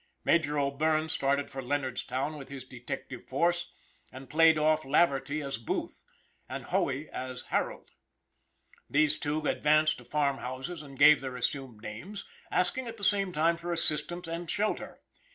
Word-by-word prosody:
Major 150 -3 +2
O'Bierne 155 +3 +1
started 140 -1 0
for 135 - -4
Leonardstown 130 +1 -2
with 140 -2 -9
his 140 -2 -7
detective 125 0 -7
force, 170 +6 +1 0.4
and 130 +1 -10
played 160 +1 +6
off 155 0 +3
Laverty 145 0 +2
as 135 -4 -3
Booth, 115 - -3 0.5
and - - -5
Hoey - - 0
as 130 0 -5
Harold. - - -2 1.0
These 155 +1 +3
two 150 +1 -1
advanced 155 +1 +3
to - - -12
farm 145 -2 0
houses 130 +7 -5
and 140 -2 -11
gave 150 0 +8
their 130 -2 -5
assumed 125 -4 -2
names, 170 - -7 0.2
asking 240 +8 +1
at 230 0 -7
the 205 - -10
same 195 -1 +2
time 165 +1 +2
for 175 +1 -5
assistance 165 +1 -1
and 165 0 -4
shelter. 210 +1 -2
150 Hz, 155 wpm, -30 LUFS, 135-165 Hz, 1.0 s, gave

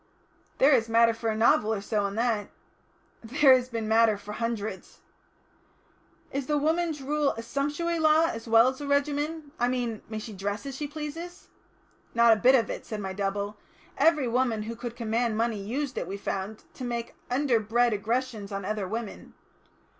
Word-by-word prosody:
"There 275 +3 +5
is 230 -4 +3
matter 230 0 +5
for 225 0 -3
a 220 - 0
novel 220 -1 +3
or 220 - 0
so 205 0 -1
in 200 - -6
that." 225 -3 0 0.8
"There 265 +4 +5
has 255 0 -1
been 225 -2 -3
matter 220 -1 +4
for 205 +1 -9
hundreds." 220 -3 -4 1.3
"Is 275 -1 -3
the 295 - +1
Woman's 315 0 0
Rule 295 +1 +1
a 230 - -7
sumptuary 295 +7 -1
law 315 +1 +5
as 230 -7 -4
well 230 +2 +6
as 260 +2 -7
a 290 - -4
regimen? 290 +2 -1
I 245 - +2
mean 245 -3 -2
may 220 - -4
she 215 0 -7
dress 205 +5 -4
as 275 -2 -5
she 295 +2 -4
pleases?" 315 +4 -7 0.7
"Not 235 -1 +6
a 215 - -2
bit 255 +2 +6
of 235 - +2
it," - - -5
said 215 - -6
my 190 -2 -4
double. 200 +1 -2 0.4
"Every 305 -5 +3
woman 235 -3 +1
who 230 +2 -5
could 235 0 -6
command 230 -1 -1
money 225 -2 0
used 255 +6 -3
it, - - -4
we 195 - -4
found, 200 +1 -4
to - - -8
make 235 -1 -4 0.2
underbred 240 -3 +2
aggressions 220 0 -2
on 195 -1 -4
other 210 -1 -2
women. 225 +1 -6
235 Hz, 185 wpm, -27 LUFS, 215-275 Hz, 1.3 s, well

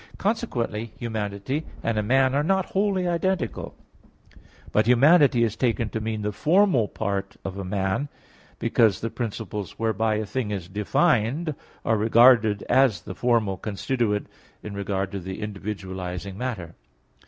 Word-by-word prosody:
Consequently 120 - -2
humanity 110 +4 -3 0.2
and 115 - 0
a - - +2
man 130 +4 +3
are 140 - +2
not 190 +4 +1
wholly 195 -2 +1
identical; 175 - -1 1.0
but 105 +1 +2
humanity 135 0 +5
is 110 -2 0
taken 115 -3 0
to 110 - -4
mean 110 -1 -3
the 105 - -1
formal 155 - +3
part 100 0 -3
of 95 -1 -4
a - - -3
man, 95 +8 -1 0.5
because 110 -5 +2
the 115 - -3
principles 105 -4 -5
whereby 110 -1 +1
a 110 0 -2
thing 120 +1 -3
is 95 -5 -4
defined 125 - +1 0.3
are 110 - +2
regarded 110 -1 +5
as 130 -10 +3
the 95 - -7
formal 115 -4 +1
constituent 105 +1 -1 0.4
in 105 - -6
regard 100 -1 -2
to 100 - -4
the 95 +1 -6
individualizing 95 -3 -5
matter. 100 -8 -4
110 Hz, 140 wpm, -25 LUFS, 100-130 Hz, 1.0 s, humanity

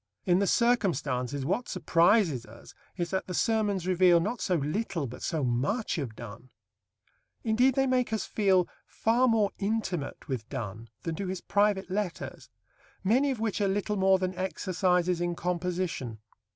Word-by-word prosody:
In 180 0 +4
the 200 - +1
circumstances 145 - +1
what 235 - -1
surprises 170 - +3
us 115 +1 -14 0.2
is 175 -1 -2
that 190 0 -2
the 180 - -4
Sermons 210 -4 +1
reveal, 180 -1 +5
not 215 +8 -2
so 180 - +1
little, 165 +2 -1
but 125 -1 -8
so 155 -3 -1
much 145 - 0
of 125 -7 -4
Donne. 115 +3 -10 0.9
Indeed, 245 +3 +3
they 270 - +3
make 255 -3 +1
us 220 -3 -1
feel 190 -4 +2 0.2
far 240 +3 +2
more 220 -4 +3
intimate 195 -9 -2
with 125 -6 -4
Donne 115 -3 -6
than 165 - -2
do 190 +4 -4
his 185 -1 -4
private 205 -2 +1
letters, 195 -3 -4 0.5
many 250 +9 +3
of 260 -4 -2
which 220 -2 -1
are 200 - +3
little 205 +2 -1
more 190 -1 +4
than 185 0 -2
exercises 180 -1 0
in 175 0 -1
composition. 175 -9 -2
185 Hz, 160 wpm, -29 LUFS, 160-210 Hz, 0.9 s, reveal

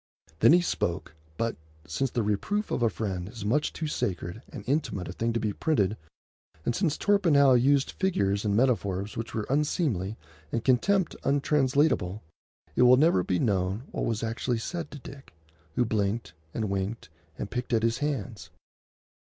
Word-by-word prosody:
Then 115 - +7
he 175 - +6
spoke; 95 - -2 0.2
but, 115 0 -1 0.3
since 130 - -1
the 120 - -1
reproof 155 - -1
of - - 0
a 115 - +4
friend 95 -5 -4
is 110 -3 -8
much 140 +8 +1
too 160 - -4
sacred 95 - -3
and - - -8
intimate 130 - -1
a - - -5
thing 115 +4 -1
to 115 - 0
be 105 -2 -1
printed, 110 -10 +1 0.7
and 120 - 0
since 170 -7 +1
Torpenhow 160 -10 +4
used 135 +3 +3
figures 100 - 0
and 100 -2 +1
metaphors 105 -5 +1
which 115 +1 -5
were 110 -2 -1
unseemly, 135 - 0 0.3
and 115 - -2
contempt 180 +9 +2
untranslatable, 140 - +2 0.5
it - - +2
will 125 +1 +7
never 150 - +4
be 90 - 0
known 95 +1 0
what - - -2
was 115 -1 -1
actually 115 +2 -1
said 165 +7 -4
to - - -9
Dick, 135 - -12 0.4
who 125 - +2
blinked 105 -4 -1 0.2
and 110 0 -2
winked 100 0 -3 0.3
and 100 - -5
picked 125 0 -3
at 115 -2 +2
his 115 0 +1
hands. 130 -7 -3
115 Hz, 170 wpm, -28 LUFS, 100-140 Hz, 0.7 s, Then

